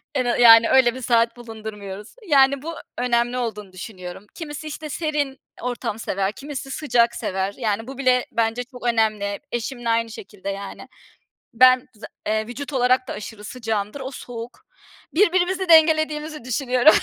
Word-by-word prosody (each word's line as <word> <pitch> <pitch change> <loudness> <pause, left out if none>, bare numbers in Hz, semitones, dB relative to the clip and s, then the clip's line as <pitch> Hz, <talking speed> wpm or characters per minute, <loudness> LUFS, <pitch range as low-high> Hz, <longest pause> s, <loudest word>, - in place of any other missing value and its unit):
Ena 245 -3 +1
yani, 230 -1 +8
öyle 255 -2 +5
bir 260 - -7
saat 235 -1 +2
bulundurmuyoruz. 215 -3 -8
Yani, 275 -3 +4
bu 330 +3 -5 0.2
önemli 240 0 +1
olduğunu 210 -5 -4
düşünüyorum. 185 0 -8
Kimisi, 310 -2 -7
işte, 305 0 -6
serin 295 -3 -2 0.2
ortam 245 -3 -3
sever, 195 -2 -1
kimisi 275 +2 -7
sıcak 240 -6 +2
sever. 190 +1 -2
Yani, 225 -2 -1
bu 270 0 -8
bile 255 -2 +3
bence 230 +1 0
çok 250 -1 -12
önemli. 215 -3 +1
Eşimle 240 0 -3
aynı 230 0 +1
şekilde, 200 -2 -8
yani. 200 0 -6 0.7
Ben 255 +1 +6
za 215 - -10 0.2
eee, 215 0 0
vücut 275 +5 -7
olarak 255 0 +2
da - - -3
aşırı 210 0 -8
sıcağımdır, 220 +1 -3
o 260 0 -5
soğuk. 240 -3 -9 0.5
Birbirimizi 370 0 +2
dengelediğimizi 310 -3 +4
düşünüyorum. 255 +3 +4
245 Hz, 150 wpm, -23 LUFS, 220-275 Hz, 0.7 s, yani